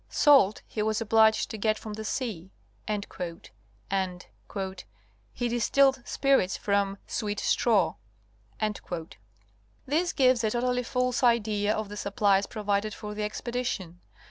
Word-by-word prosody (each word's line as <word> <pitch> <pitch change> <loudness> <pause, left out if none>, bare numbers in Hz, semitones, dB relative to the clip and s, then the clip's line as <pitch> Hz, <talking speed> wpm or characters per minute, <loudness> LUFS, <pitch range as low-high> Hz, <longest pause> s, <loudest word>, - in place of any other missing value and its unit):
Salt 270 - +5
he 215 - -3
was 215 0 0
obliged 220 -1 +3
to 220 - -6
get 215 +1 +1
from 215 -1 -7
the 220 +1 -6
sea," 215 -7 -3 0.4
and 210 -2 -2
''he 170 - -6 0.9
distilled 265 +3 +3
spirits 270 -9 +2
from 200 -1 0
'sweet 210 -2 -3
straw.'" 195 -9 +2 1.9
This 330 +6 +1
gives 255 -3 +3
a 220 - +2
totally 250 +2 0
false 250 0 -1
idea 215 -4 +2
of 215 -1 -3
the 205 - -7
supplies 200 -1 +2
provided 210 -1 -1
for 210 0 -7
the 210 - -5
expedi 240 +4 -3
tion. 180 -7 -4
215 Hz, 125 wpm, -28 LUFS, 200-240 Hz, 1.9 s, Salt